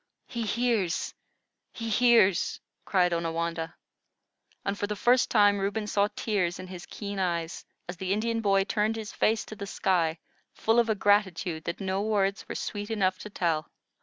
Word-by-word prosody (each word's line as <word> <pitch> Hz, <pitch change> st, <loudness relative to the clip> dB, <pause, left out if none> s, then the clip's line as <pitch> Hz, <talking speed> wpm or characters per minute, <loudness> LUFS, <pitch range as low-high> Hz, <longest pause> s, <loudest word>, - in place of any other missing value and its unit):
"He 235 Hz, -2 st, -5 dB
hears! 225 Hz, -7 st, 0 dB, 0.6 s
he 230 Hz, -, -6 dB
hears!" 225 Hz, -5 st, +4 dB, 0.3 s
cried 180 Hz, -3 st, +2 dB
Onawandah, 165 Hz, 0 st, -2 dB, 0.9 s
and 200 Hz, -, 0 dB
for 205 Hz, -, -2 dB
the 210 Hz, -, -2 dB
first 245 Hz, +5 st, +3 dB
time 205 Hz, -2 st, +5 dB
Reuben 200 Hz, +2 st, -1 dB
saw 205 Hz, 0 st, +2 dB
tears 190 Hz, -5 st, 0 dB
in 185 Hz, -, -7 dB
his 180 Hz, -1 st, -9 dB
keen 200 Hz, -2 st, -5 dB
eyes, 170 Hz, -2 st, -2 dB, 0.2 s
as 175 Hz, 0 st, -6 dB
the 190 Hz, +2 st, -3 dB
Indian 225 Hz, +3 st, 0 dB
boy 195 Hz, -2 st, +3 dB
turned 215 Hz, +2 st, 0 dB
his 220 Hz, -2 st, -6 dB
face 220 Hz, +1 st, +1 dB
to 215 Hz, -, -9 dB
the 200 Hz, -2 st, -6 dB
sky, 170 Hz, -5 st, +1 dB, 0.4 s
full 225 Hz, +2 st, +3 dB
of 235 Hz, -1 st, +2 dB
a 220 Hz, -, +2 dB
gratitude 190 Hz, -5 st, +1 dB
that 170 Hz, -, -3 dB
no 190 Hz, 0 st, -1 dB
words 200 Hz, -2 st, 0 dB
were -, -, -4 dB
sweet 205 Hz, 0 st, -4 dB
enough 190 Hz, -4 st, +1 dB
to 210 Hz, -, -8 dB
tell. 165 Hz, -6 st, -1 dB
200 Hz, 170 wpm, -28 LUFS, 180-215 Hz, 0.9 s, time